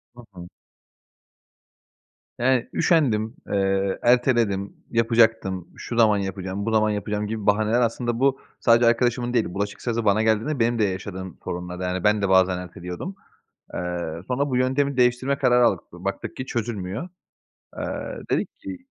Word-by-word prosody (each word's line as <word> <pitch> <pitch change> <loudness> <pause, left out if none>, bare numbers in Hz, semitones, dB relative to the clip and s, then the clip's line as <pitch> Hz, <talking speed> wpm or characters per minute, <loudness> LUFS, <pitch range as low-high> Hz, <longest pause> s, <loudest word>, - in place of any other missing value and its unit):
Hı 120 - -11
hı. 85 -1 -9 1.9
Yani, 125 -1 +2
üşendim, 120 -8 +2
eee, 95 -1 0
erteledim, 120 -5 +2 0.2
"Yapacaktım, 115 -6 +2
şu 120 - -5
zaman 110 -3 +5
yapacağım, 95 +1 -4
bu 115 - 0
zaman 110 -1 +3
yapacağım." 105 0 -2
gibi 110 -1 -4
bahaneler 110 +3 +3
aslında 120 0 -1
bu 135 0 +2 0.2
sadece 115 0 +5
arkadaşımın 120 +1 +2
değil, 120 -3 +2
bulaşık 100 +1 -3
sırası 115 -2 -2
bana 105 +2 +3
geldiğinde 110 +6 +1
benim 115 0 +2
de - - +3
yaşadığım 95 -2 -4
sorunlardı. 90 +1 -5
Yani, 90 0 -2
ben 105 0 +3
de 100 - 0
bazen 95 -1 +4
erteliyordum. 90 - -7 0.6
Eee, - - -3 0.5
sonra 140 +3 0
bu 125 - 0
yöntemi 130 +2 +1
değiştirme 125 +3 +2
kararı 125 -1 +4
aldık. - - +1
Baktık - - -5
ki 130 - -4
çözülmüyor. 115 - -4 0.7
Eee, - - -3 0.5
dedik - - +1
ki 285 -3 -7
110 Hz, 145 wpm, -24 LUFS, 100-125 Hz, 1.9 s, zaman